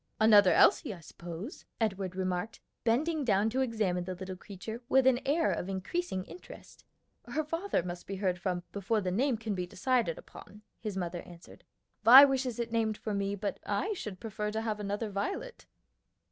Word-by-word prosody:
"Another 210 -3 +7
Elsie, 205 - +4
I - - -13
suppose," 170 - -9
Edward 195 -4 -1
remarked, 185 +3 -2 0.2
bending 295 +7 +1
down 215 -2 +2
to 260 +3 0
examine 210 -8 0
the 185 0 -4
little 185 +1 -6
creature 205 +5 -8
with 265 -1 +4
an 260 -2 +5
air 320 +4 +2
of 180 - -3
increasing 190 - -2
interest. 360 - -13 0.4
"Her 295 +6 -1
father 330 - -1
must 175 0 -7
be 195 - -4
heard 185 -2 -1
from 180 -1 -2
before 205 +2 0
the 185 -2 -2
name 245 +5 +1
can 220 -1 -3
be 180 -2 -3
decided 230 -2 0
upon," 210 +1 -13 0.2
his 210 -3 -4
mother 175 -1 -3
answered. 175 0 -14 0.4
"Vi 260 +5 +11
wishes 260 -3 -1
it 235 -1 -3
named 220 -2 0
for 215 - -4
me, 200 0 -1
but 200 0 -4
I 360 - -1
should 210 - -6
prefer 210 -1 -4
to 220 - -1
have 215 -2 -2
another 205 +1 -3
Violet." 395 - -4
210 Hz, 180 wpm, -31 LUFS, 185-245 Hz, 0.4 s, Vi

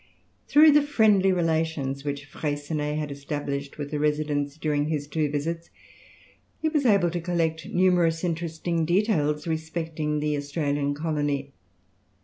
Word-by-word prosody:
Through 305 +2 +7
the 295 +1 +6
friendly 215 -9 +3
relations 160 -6 0
which 145 0 -4
Freycinet 150 +1 -3
had 150 -2 -3
established 140 0 -4
with 145 -1 -5
the 150 - -2
residents 150 -1 0
during 150 -2 0
his 150 -2 -2
two 150 0 -1
visits, 165 +4 -3 0.9
he 315 - +1
was 300 -4 +1
able 195 -6 +4
to 175 0 -3
collect 165 -2 -1
numerous 175 -2 +2
interesting 170 0 -1
details 160 -5 +1
respecting 160 -2 -2
the 150 0 0
Australian 145 -1 -1
colony. 145 -3 -2
155 Hz, 130 wpm, -26 LUFS, 145-170 Hz, 0.9 s, Through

